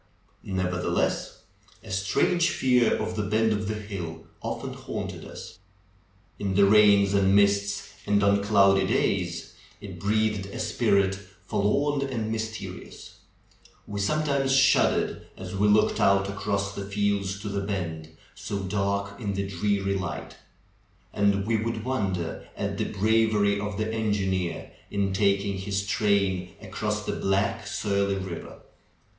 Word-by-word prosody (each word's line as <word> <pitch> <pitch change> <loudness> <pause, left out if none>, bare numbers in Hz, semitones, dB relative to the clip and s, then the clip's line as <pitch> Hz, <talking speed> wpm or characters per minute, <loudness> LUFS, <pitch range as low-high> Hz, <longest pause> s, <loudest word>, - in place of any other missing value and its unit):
Never 90 -1 -2
theless, - - -1 0.4
a 110 - -10
strange 165 - +2
fear 125 -2 +3
of 110 0 -3
the 105 - -1
bend 110 +2 +1
of 105 0 -2
the 110 - -2
hill 95 -6 -6 0.2
often - - -4
haunted - - -6
us. - - -10 0.8
In 100 -2 -1
the 100 0 +6
rains 100 -1 +5
and 100 -1 +4
mists 100 0 +2
and 100 0 +3
on 100 0 +4
cloudy 100 -2 +4
days 90 -7 -1 0.3
it - - -9
breathed 105 -1 0
a 100 - -8
spirit 100 -1 +2 0.3
forlorn 140 +10 +1
and 120 -5 -2
mysterious. 110 0 -6 0.7
We 100 -1 -5
sometimes 140 +4 +1
shud 135 0 +5
dered, - - -2 0.2
as 95 0 -7
we 105 +2 +2
looked 105 +1 +3
out 100 0 +4
across 100 0 -2
the 100 - -5
flelds 100 -1 0
to 105 - -3
the 100 0 -2
bend, 85 -6 -4 0.2
so 100 - -5
dark 100 +1 -2
in 100 -2 -2
tlie 100 0 -2
dreary 100 +1 0
light. 95 -2 -5 0.8
And 100 -1 +2
we 115 0 +1
would 110 0 -3
wonder 95 -10 -2
at - - -3
the - - +1
bravery 105 -1 +2
of 105 -1 -4
the 110 +1 -2
engineer 95 -5 -1 0.2
in 100 -1 -1
taking 100 0 +1
his 100 0 -2
train 100 -3 +1
across 105 -1 -3
the - - -2
black, 105 +3 0
surly 100 -1 0
river. 95 -3 -7
100 Hz, 140 wpm, -26 LUFS, 95-105 Hz, 0.8 s, the